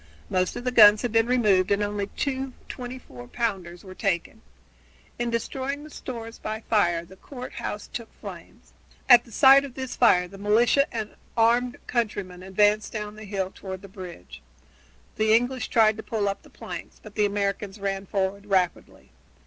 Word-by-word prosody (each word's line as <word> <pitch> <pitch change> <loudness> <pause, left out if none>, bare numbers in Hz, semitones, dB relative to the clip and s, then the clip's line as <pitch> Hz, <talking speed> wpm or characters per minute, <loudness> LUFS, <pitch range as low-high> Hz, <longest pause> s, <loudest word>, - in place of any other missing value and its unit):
Most 185 0 +1
of - - -5
the 250 - 0
guns 210 -2 +8
had 245 - -1
been 225 +1 +3
removed 210 -7 +3
and 200 +1 +2
only 205 -1 -2
two 265 -2 -2
twenty 250 0 -6
four 125 - -12
pounders 190 - -3
were 190 -2 -10
taken. 185 -3 -2 0.8
In 240 0 0
destroying 265 +5 -3
the 305 - -12
stores 230 -4 -7
by 220 +1 -4
fire 175 -7 +1
the 190 - -15
court 250 +5 -9
house 210 - -4
took 235 -2 -7
flames. - - -11 0.3
At 245 -2 +8
the 235 - -16
sight 270 +4 +7
of 270 -3 -8
this 260 -2 -5
fire 180 -7 +4
the 195 +2 -13
militia 230 +7 +3
and 220 -2 -4 0.2
armed 240 +2 +3
countrymen 205 -7 -2
advanced 205 +3 +2
down 210 -1 -5
the 215 0 -10
hill 195 -2 -3
toward 190 0 -8
the - - -9
bridge. 175 - -10 0.8
The 220 0 +4
English 245 0 0
tried 220 -2 +4
to - - -5
pull 215 -2 -2
up 200 0 -2
the - - -18
planks, - - -9
but 215 - -11
the 210 -1 +2
Americans 200 0 -2
ran 195 0 -3
forward 200 +1 -2
rapidly. 185 - -1
210 Hz, 180 wpm, -25 LUFS, 195-240 Hz, 0.8 s, guns